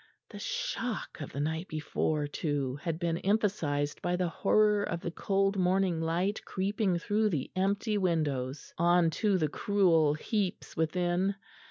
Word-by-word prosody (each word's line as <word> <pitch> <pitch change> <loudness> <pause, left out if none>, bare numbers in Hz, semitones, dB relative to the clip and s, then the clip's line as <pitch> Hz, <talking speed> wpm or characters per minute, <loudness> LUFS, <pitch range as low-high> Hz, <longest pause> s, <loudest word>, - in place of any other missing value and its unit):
The - - -8
shock - - -3
of 145 - -6
the 140 - -5
night 160 +4 -2
before 155 -1 -1
too 145 -3 -2
had 160 +1 -3
been 170 -1 -1
emphasised 185 -9 0
by 175 - 0
the 180 -1 0
horror 210 +4 +3
of 170 -4 -2
the 170 - -3
cold 195 +3 +1
morning 185 -2 +2
light 175 +6 0
creeping 195 -1 0
through 210 +5 +1
the 150 -9 -2
empty 205 +3 +1
windows 145 -7 -1
on 170 -1 +4
to 205 -3 +3
the 155 -4 +1
cruel 165 -3 +3
heaps 195 +3 -2
within. 175 +4 +1
175 Hz, 150 wpm, -30 LUFS, 155-200 Hz, -, on